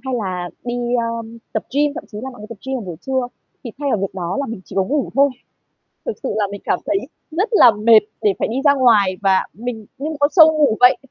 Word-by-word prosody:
Hay 260 - -2
là 185 -6 -3
đi, 240 0 -3 0.2
ơm, 230 -1 -3
tập 220 - -1
gym, 290 0 +2
thậm - - -7
chí 210 - -6
là 265 - -5
mọi 245 - -14
người 210 - -8
tập 230 - -9
gym 265 0 -1
vào 235 - -6
buổi 175 -3 -7
trưa, 260 -2 0 0.4
thì 235 - -5
thay 285 -2 -1
vào 215 - +1
việc 195 -1 -3
đó 180 0 -3
là 280 - -2
mình 230 -3 -6
chỉ - - -11
có 195 - +4
ngủ 285 +7 -1
thôi. 280 0 +4 0.8
Thực 475 - -2
sự 265 - -2
là 205 -2 +1
mình 200 - -7
cảm - - 0
thấy 200 - +1 0.3
rất 375 +8 0
là 250 - +7
mệt 215 +1 +6 0.2
để 210 -3 +3
phải - - 0
đi 230 - -3
ra 285 - +7
ngoài 215 -8 +3
và 190 -1 +3
mình 225 -1 -6
như 290 +3 -4
một 315 - -4
con 285 0 +3
sâu 315 -3 +8
ngủ 285 -8 +3
vậy, 250 +1 +6
235 Hz, 265 wpm, -19 LUFS, 205-275 Hz, 0.8 s, sâu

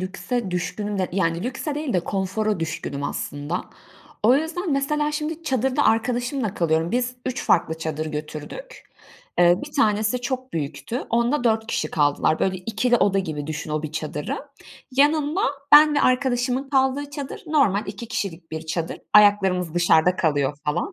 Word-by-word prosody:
lükse 190 +4 -3
düşkünüm 200 +3 -3
de 185 - 0
yani 170 -2 0
lükse 260 +4 -3
değil 295 -2 -3
de 180 - +2
konfora 195 +2 -1
düşkünüm 155 -3 -4
aslında. 145 +5 -3 0.6
O 230 +4 +6
yüzden, 320 +3 -2
mesela, 295 +2 0
şimdi 305 +2 -3
çadırda 265 -1 +1
arkadaşımla 240 0 0
kalıyorum. 165 0 +1
Biz 245 +1 -1
3 255 0 -3
farklı 160 -2 +2
çadır 155 -1 -3
götürdük. 155 - -7 0.6
Eee, 175 0 +5
1 - - -11
tanesi 215 0 +2
çok 255 +1 -4
büyüktü. 145 - -3
Onda 240 +3 +1
4 220 -1 +2
kişi 155 - -2
kaldılar. 145 +1 +2
Böyle 190 -1 0
2'li 225 +6 +1
oda 200 -3 +2
gibi 155 -6 -3
düşün 155 0 -5
o 155 0 -1
1 155 -1 -5
çadırı. 150 -1 -3 0.5
Yanında 295 +5 +2 0.3
ben 300 0 +9
ve 290 - +3
arkadaşımın 255 0 +1
kaldığı 270 +1 +1
çadır 280 -1 -6
normal 270 -11 +2
2 200 +4 -7
kişilik 170 -6 -4
bir 160 0 -5
çadır. 165 0 -3
Ayaklarımız 195 -5 +4
dışarıda 175 0 +4
kalıyor 145 -3 +1
falan. 170 - -1
210 Hz, 155 wpm, -23 LUFS, 165-260 Hz, 0.6 s, ben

